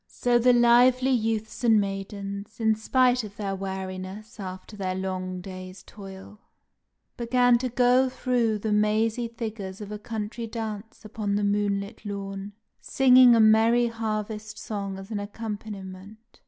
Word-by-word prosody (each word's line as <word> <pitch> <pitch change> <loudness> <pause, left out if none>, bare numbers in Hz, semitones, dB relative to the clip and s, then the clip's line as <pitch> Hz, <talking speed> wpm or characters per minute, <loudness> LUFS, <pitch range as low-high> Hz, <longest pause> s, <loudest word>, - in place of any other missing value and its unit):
So 245 -1 +1
the 250 +1 +5
lively 245 +2 +5
youths 225 -2 -1
and 225 -3 +5
maidens, 200 +1 -5
in 220 -1 +3
spite 250 +3 +2
of 205 -1 -10 0.2
weariness 190 +3 -6
after 185 +2 -8
their 185 -2 -3
long 185 -1 -4
day's 185 0 -9
toil, 195 0 -12 0.8
began 245 0 +3
to 255 +1 -2
go 250 +1 +3
through 245 -4 0
the 215 +1 -3
mazy 215 +3 +1
figures 220 -5 -6
of 210 -1 -8
a 210 - -5
country 220 +1 -5
dance 220 -1 -6
upon 210 -1 -3
the 205 - 0
moonlit 200 0 -1
lawn, 200 -1 -6 0.3
singing 255 -2 +6
a - - +4
merry 225 +2 +5
harvest 215 -1 -4
song 200 -3 -5
as 195 +2 -10
an 210 - -2
accompaniment. 205 0 -8
215 Hz, 140 wpm, -26 LUFS, 200-235 Hz, 0.8 s, singing